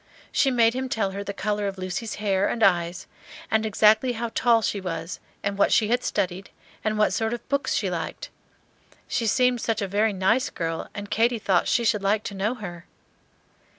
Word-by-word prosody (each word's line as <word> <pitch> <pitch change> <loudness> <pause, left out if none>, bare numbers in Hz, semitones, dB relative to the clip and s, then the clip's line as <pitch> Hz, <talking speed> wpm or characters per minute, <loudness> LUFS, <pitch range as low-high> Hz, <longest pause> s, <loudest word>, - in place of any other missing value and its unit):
She 275 - +3
made 230 -3 +3
him 260 +1 -3
tell 215 -5 0
her 200 +1 -5
the 200 - -4
color 205 0 -2
of 195 -1 -4
Lucy's 185 +4 -4
hair 200 -2 +1
and 230 - -1
eyes, 175 -1 +2 0.5
and 220 0 +2
exactly 215 +4 +4
how 235 0 -4
tall 230 -2 +3
she 200 - -1
was, 165 -1 -5 0.2
and 200 0 -2
what - - +4
she 215 - +3
had 245 +1 +1
studied, 190 -1 -2 0.3
and 215 0 0
what 210 - +3
sort 225 +1 0
of 240 - -13
books 280 +1 0
she - - 0
liked. - - -5 0.8
She 230 - -1
seemed 250 +1 +2
such 225 - -1
a 200 - -1
very 210 +3 +1
nice 210 +7 +1
girl, 165 -1 -4
and 205 0 -7
Katy 230 +3 +2
thought 195 -4 +1
she 235 - +2
should 210 -2 +2
like 205 +2 +1
to - - -5
know 205 +5 -1
her. 175 -7 -8
210 Hz, 200 wpm, -25 LUFS, 195-230 Hz, 0.8 s, exactly